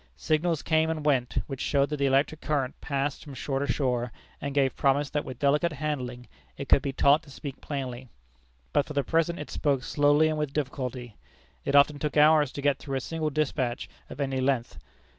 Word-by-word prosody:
Signals 160 0 0
came 160 0 +2
and 155 -2 -3
went, 130 -5 +1
which 135 -2 -6
showed 140 0 +1
that 150 - -1
the 140 -1 +2
electric 140 +3 +1
current 140 -4 -1
passed 140 0 -2
from 145 -3 -10
shore 135 0 -2
to 140 -2 0
shore, 125 -3 -1 0.3
and 140 -1 -4
gave 135 -2 +2
promise 140 +1 +1
that 145 - -1
with 130 - -8
delicate 150 +5 +2
handling 130 -5 -4 0.3
it 140 - -5
could 135 - +5
be 140 - -2
taught 140 +3 +4
to 160 - -17
speak 140 -1 -8
plainly. 130 -3 -5 0.6
But 145 - +2
for 150 - -6
the 140 -1 +1
present 165 +2 +1
it 150 - -7
spoke 140 -3 0
slowly 145 +2 +3
and 155 -1 -1
with 150 -2 -2
difficulty. 125 -5 -4 0.5
It 140 - 0
often 145 +1 +5
took 150 0 -2
hours 150 -2 +5
to 140 - -6
get 145 -1 +2
through 135 -2 -5
a - - 0
single 155 +3 -2
despatch 135 -4 -1 0.2
of - - -9
any 135 -2 -1
length. 130 -3 -1
140 Hz, 205 wpm, -27 LUFS, 135-150 Hz, 0.6 s, could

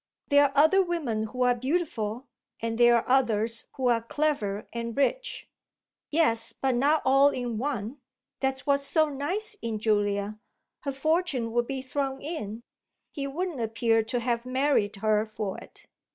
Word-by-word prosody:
"There 285 0 +6
are 275 - 0
other 315 +7 +6
women 300 - -1
who 250 +4 -2
are 250 0 +4
beautiful, 250 -4 -2 0.3
and 230 0 -3
there 240 0 +7
are 235 - 0
others 230 -3 +2
who 260 -1 -1
are 235 -2 +3
clever 230 -6 -1
and 235 +1 -4
rich." - - -1 0.6
"Yes, 290 -8 +2
but 265 -1 0
not 285 +5 +2
all 275 +2 +6
in 245 -5 -3
one: 255 -1 -3 0.4
that's 265 -1 -1
what's 280 -1 +2
so 310 +2 +3
nice 360 +10 -3
in 225 -2 -2
Julia. 205 -1 0 0.4
Her 280 - -3
fortune 290 -5 0
would 240 +1 0
be 270 -1 -4
thrown 270 0 -2
in; 235 -8 -5 0.5
he 275 -1 -4
wouldn't 320 -1 -3
appear 225 0 +2
to 245 +2 -1
have 235 0 -1
married 255 -5 +1
her 215 +1 +2
for 215 -3 -5
it." - - -16
255 Hz, 160 wpm, -27 LUFS, 225-285 Hz, 0.6 s, there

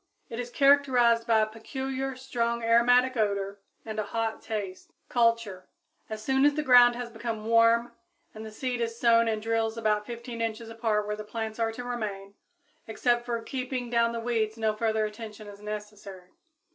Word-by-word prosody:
It 230 - -6
is 245 0 -4
characterized 250 -4 +4
by 225 -2 +4
a - - +3
peculiar, 265 +4 -5
strong 235 -2 -2
aromatic 245 +3 +4
odor, 200 -2 -1 0.2
and 215 -1 -4
a - - 0
hot 225 +2 -3
taste. 200 -4 -6 0.2
Culture. 230 -6 +1 0.4
As 215 -1 -6
soon 265 +3 +2
as 290 0 +4
the 305 - -1
ground 245 -3 +7
has 240 -1 -6
become 225 -1 -5
warm 230 +1 +4 0.4
the 220 0 -8
seed 245 +2 -3
is 230 0 -3
sown 230 -1 +4
in 220 -1 -1
drills 225 0 -1
about 210 -2 0
15 235 0 -6
inches 225 0 -3
apart 225 -2 -1
where 210 0 -2
the 215 - -7
plants 220 +1 -5
are 225 -1 +1
to 245 - -6
remain. 205 -5 -5 0.5
Except 240 +2 +1
for 235 -1 -2
keeping 255 -1 -4
down 235 -1 +3
the 235 - -4
weeds 225 -2 -1
no 220 -1 +1
further 220 0 0
attention 215 0 -8
is 205 0 -11
necessary. 210 -3 -8
230 Hz, 175 wpm, -28 LUFS, 215-240 Hz, 0.5 s, ground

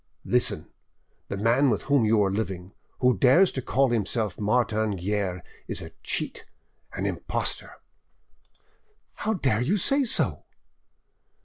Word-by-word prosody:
Listen: - - +1 0.6
the 100 - -4
man 120 +7 +3
with 105 - 0
whom 140 -5 +3
you 110 -1 +3
are 95 - +1
living, 95 -3 -4 0.3
who 125 -1 +4
dares 135 - +5
to 130 - -4
call 135 +1 +1
himself 110 -1 -1
Martin 110 -1 +1
Guerre, 95 -1 -2 0.2
is - - -3
a - - -8
cheat, - - -3 0.5
an - - -3
impostor——" - - -2 1.4
"How 220 +1 -2
dare 130 - +1
you 170 +12 +1
say 275 +8 +2
so?" 240 - 0
115 Hz, 130 wpm, -26 LUFS, 100-135 Hz, 1.4 s, dares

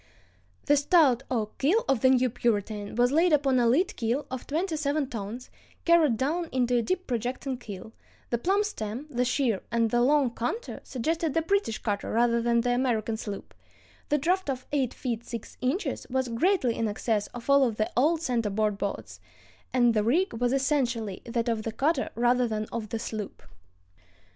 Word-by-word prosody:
"The 290 - +4
stout 280 -4 +4
oak 220 -4 -2
keel 400 - +2
of 270 - +2
the 260 - +5
new 255 -1 +4
Puritan 210 -3 -1
was 245 +2 +3
laid 330 +4 +3
upon 275 -4 +3
a 240 - +3
lead 315 +11 +2
keel 240 +5 -1
of 260 -1 -5
twenty 325 +3 -1
seven 295 -1 0
tons, 230 +1 -6 0.3
carried 325 -8 +4
down 320 +7 -1
into 250 -1 +1
a 240 - +3
deep 370 +9 -2
projecting 250 +2 -2
keel; 210 -1 -9 0.4
the 235 - +1
plumb 390 - +2
stem, 235 - -5
the 250 -2 +1
sheer, 250 -5 0
and 230 -1 +1
the 240 - +3
long 270 -1 +3
counter 430 - -4
suggested 315 +4 -2
the 325 - +2
British 395 - 0
cutter 205 -3 -3
rather 235 0 +2
than 235 0 +2
the 245 +1 0
American 235 -3 0
sloop; 205 -2 -7 0.6
the 295 - +3
draft 355 +3 0
of 255 -1 -3
eight 270 -4 +1
feet 235 -3 -3
six 230 -2 -7
inches 270 +11 -2
was 260 -1 -1
greatly 255 - +1
in 225 - 0
excess 210 0 -1
of 245 -1 -10
all 280 0 +5
of 235 -4 +1
the 215 0 -1
old 315 +6 +2
center 235 -6 0
board 210 0 0
boats, 200 - -4 0.5
and 240 -2 +4
the 215 -1 +2
rig 335 - +2
was 245 +1 0
essentially 255 -7 0
that 235 0 -2
of 230 -2 0
the 225 - -4
cutter 280 +9 0
rather 245 +1 +2
than 215 -1 -2
of 220 -3 -4
the 225 - -2
sloop." 215 -2 -6
245 Hz, 185 wpm, -27 LUFS, 230-290 Hz, 0.6 s, the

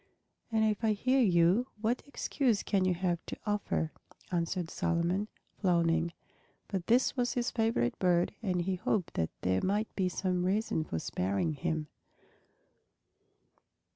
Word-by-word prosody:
"And 220 -1 +3
if 215 +1 0
I 220 -1 +3
hear 255 +6 +2
you, 185 +3 +4
what 230 +4 0
excuse 260 -5 0
can 195 -3 +1
you 185 -1 +2
have 175 -1 -1
to - - -5
offer?" 205 -6 -1 0.4
answered 170 0 -1
Solomon, 175 +4 0 0.3
frowning. 170 -3 +2 0.6
But 190 -3 -3
this 245 +3 +3
was 245 -2 0
his 245 -2 -1
favorite 225 - 0
bird 175 -2 +2
and 180 -5 0
he 185 +1 -1
hoped 185 0 -1
that 80 - 0
there 95 0 +1
might 205 +3 -1
be 185 -2 +1
some 180 0 -1
reason 190 -3 +1
for 80 - -3
sparing 100 - -1
him. 155 +1 -2
185 Hz, 140 wpm, -31 LUFS, 170-220 Hz, 0.6 s, you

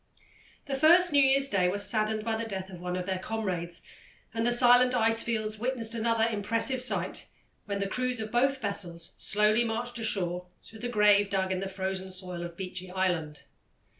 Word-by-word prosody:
The 280 - -5
first 325 +4 +5
New 285 - +6
Year's 275 0 +4
Day 185 -6 +1
was 200 +2 0
saddened 215 -1 0
by 225 0 -1
the 225 0 -4
death 190 -1 -5
of 175 -2 -10
one 180 0 -3
of 180 0 -3
their 190 -1 -2
comrades, 185 -5 -3 0.5
and 225 +1 -1
the - - +2
silent 245 +1 +5
ice 225 -1 +4
fields 215 -2 -2
witnessed 235 -2 -1
another 230 0 +1
impressive 230 +4 -1
sight 255 - +3 0.4
when 200 -1 -3
the 200 - -2
crews 250 +3 -2
of 220 0 -5
both 270 +3 +2
vessels 180 -6 -3
slowly 210 +3 +2
marched 235 +1 -3
ashore 180 -5 -2 0.2
to 220 - -13
the 245 +2 -4
grave 205 -3 +4
dug 190 -1 -1
in 185 - -1
the 195 0 -4
frozen 190 0 -4
soil 185 -2 -6
of 170 0 -8
Beechy 185 -1 -6
Island. 175 -5 -2
215 Hz, 190 wpm, -28 LUFS, 190-235 Hz, 0.5 s, New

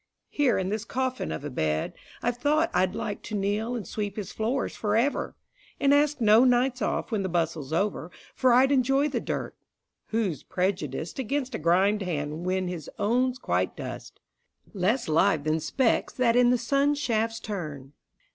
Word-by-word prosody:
Here 285 -4 +2
in 190 0 -1
this 215 +1 -2
coffin 260 +2 -2
of - - -5
a 145 - -4
bed, 80 -9 -1 0.3
I've 240 0 0
thought 300 +5 +2
I'd 185 +1 +1
like 205 - -4
to 215 - -6
kneel 210 +4 -1
and 225 -5 -4
sweep 205 -2 -4
his 210 -3 -5
floors 235 +5 -2
for 210 -1 -1
ever, 255 +6 0 0.4
And 280 0 +4
ask 295 0 +3
no 220 +1 +6
nights 250 0 +2
off - - -1
when 215 -3 0
the 190 - -2
bustle's 165 -4 -1
over, 175 -1 -1 0.2
For 255 - +3
I'd 260 +3 +5
enjoy 270 +2 +3
the - - -1
dirt; - - -4 0.5
who's 215 -8 -1
prejudiced 180 - -2
Against 265 +1 -2
a - - -3
grimed 190 +6 +3
hand 160 -1 -3
when 185 0 0
his 175 -5 -6
own's 250 +4 +1
quite - - -1
dust, - - -7 0.5
Less 210 +6 0
live 160 0 +3
than 155 +1 +1
specks 230 - +1
that 240 -2 +2
in 245 0 +5
the 250 - +4
sun 275 +4 +1
shafts 230 -5 -1
turn? 150 -9 -6
215 Hz, 175 wpm, -27 LUFS, 180-255 Hz, 0.5 s, no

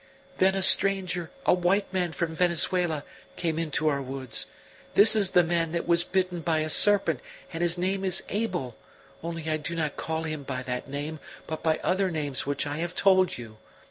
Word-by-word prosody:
"Then 190 +1 +3
a 195 - 0
stranger, 190 -3 +4 0.2
a - - +4
white 185 +3 0
man 180 -2 -1
from 165 0 -3
Venezuela, 170 -2 +1 0.3
came 165 -2 -2
into 155 -1 -2
our 140 -2 0
woods: 130 -3 -1 0.5
this 215 +2 +7
is 200 -3 +4
the 180 - +4
man 165 -1 -1
that 170 - -3
was 170 0 +4
bitten 185 -1 -2
by 160 -1 -1
a 155 - -3
serpent, 195 -9 +4 0.3
and 165 - -5
his 175 0 +3
name 190 +2 -2
is 190 -1 +2
Abel; 185 - -3 0.5
only 165 -1 -6
I 155 0 0
do 160 +2 -5
not 155 -3 -3
call 160 0 -4
him 155 -2 -5
by 130 -2 -5
that 125 +1 -5
name, 145 +3 -5 0.3
but 160 - -6
by 160 -1 0
other 190 +1 0
names 145 -6 -3
which 145 0 -1
I 145 0 -4
have 175 +2 -4
told 185 -2 +2
you. 110 -3 -11
165 Hz, 195 wpm, -26 LUFS, 155-185 Hz, 0.5 s, this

